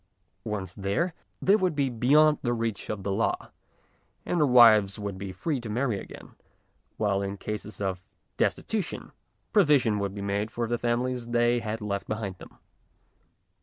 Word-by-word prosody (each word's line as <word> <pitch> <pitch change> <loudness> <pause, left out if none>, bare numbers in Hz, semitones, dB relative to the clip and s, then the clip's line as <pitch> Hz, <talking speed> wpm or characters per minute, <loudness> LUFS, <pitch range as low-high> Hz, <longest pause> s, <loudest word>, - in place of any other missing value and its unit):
Once 100 -4 -4
there, 100 - -1 0.3
they 195 - +5
would 185 -6 +1
be 140 -2 +1
beyond 145 +5 +4
the 120 -2 0
reach 115 -3 -3
of 105 -2 -4
the 100 - -2
law, 110 +4 -1 0.7
and 175 - 0
their 150 - +4
wives 110 -6 +6
would 100 -2 -4
be 95 0 -6
free 130 - -2
to 115 - -7
marry 120 -2 0
again, - - -11 0.7
while 100 -2 +1
in 100 0 -4
cases 105 -1 -6
of 95 -2 -2 0.3
destitution 210 -6 -2 0.4
provision 145 - +4
would 100 0 -3
be 100 - -5
made 100 +2 -1
for 115 +1 -2
the 120 +1 -1
families 120 0 -1
they 120 0 +2
had 110 0 -4
left 100 -1 -3
behind 105 -3 -3
them. - - -14
115 Hz, 165 wpm, -27 LUFS, 100-125 Hz, 0.7 s, wives